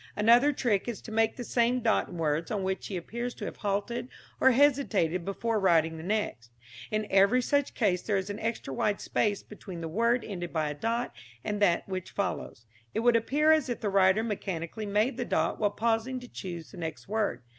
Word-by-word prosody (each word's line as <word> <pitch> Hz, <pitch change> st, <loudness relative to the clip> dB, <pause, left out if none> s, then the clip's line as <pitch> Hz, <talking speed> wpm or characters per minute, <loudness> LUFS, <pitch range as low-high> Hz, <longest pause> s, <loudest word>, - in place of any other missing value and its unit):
Another 235 Hz, +7 st, +5 dB
trick 235 Hz, -8 st, 0 dB
is 235 Hz, -3 st, -3 dB
to 225 Hz, -, -9 dB
make 225 Hz, 0 st, +2 dB
the 245 Hz, -, -5 dB
same 240 Hz, +1 st, +2 dB
dot 225 Hz, -2 st, +1 dB
in 175 Hz, -, -8 dB
words 160 Hz, 0 st, 0 dB
on 205 Hz, -3 st, -2 dB
which 190 Hz, 0 st, -2 dB
he 190 Hz, -, -3 dB
appears 235 Hz, +8 st, -5 dB
to -, -, -6 dB
have -, -, -6 dB
halted 220 Hz, +5 st, -2 dB, 0.3 s
or 265 Hz, -, +6 dB
hesitated 240 Hz, -, +2 dB
before 215 Hz, +4 st, -1 dB
writing 165 Hz, -4 st, +3 dB
the -, -, -7 dB
next. 190 Hz, -, -2 dB, 0.4 s
In 215 Hz, 0 st, -1 dB
every 200 Hz, +6 st, +5 dB
such 285 Hz, +2 st, 0 dB
case 190 Hz, -6 st, +1 dB
there 205 Hz, -3 st, 0 dB
is 190 Hz, 0 st, -2 dB
an 205 Hz, -, -6 dB
extra 225 Hz, -11 st, -3 dB
wide 205 Hz, +9 st, 0 dB
space 205 Hz, -2 st, 0 dB
between 195 Hz, -4 st, -9 dB
the 165 Hz, -, -4 dB
word 230 Hz, +7 st, +1 dB
ended 175 Hz, -4 st, -5 dB
by 155 Hz, -2 st, 0 dB
a -, -, -3 dB
dot 230 Hz, +11 st, -2 dB, 0.3 s
and 210 Hz, -1 st, -2 dB
that 175 Hz, -4 st, +3 dB
which 185 Hz, -2 st, -4 dB
follows. 180 Hz, -, -4 dB, 0.3 s
It -, -, +1 dB
would 240 Hz, 0 st, +4 dB
appear 290 Hz, +7 st, +3 dB
as 310 Hz, -4 st, +3 dB
if 240 Hz, -, -2 dB
the 210 Hz, -, 0 dB
writer 195 Hz, +2 st, +4 dB
mechanically 200 Hz, -1 st, -4 dB
made 210 Hz, +6 st, +1 dB
the -, -, -1 dB
dot -, -, 0 dB
while 210 Hz, -, +3 dB
pausing 230 Hz, +4 st, 0 dB
to 250 Hz, -, -10 dB
choose 175 Hz, -7 st, -7 dB
the 195 Hz, -, -12 dB
next 160 Hz, -2 st, -6 dB
word. 205 Hz, -, -1 dB
210 Hz, 210 wpm, -29 LUFS, 185-235 Hz, 0.4 s, or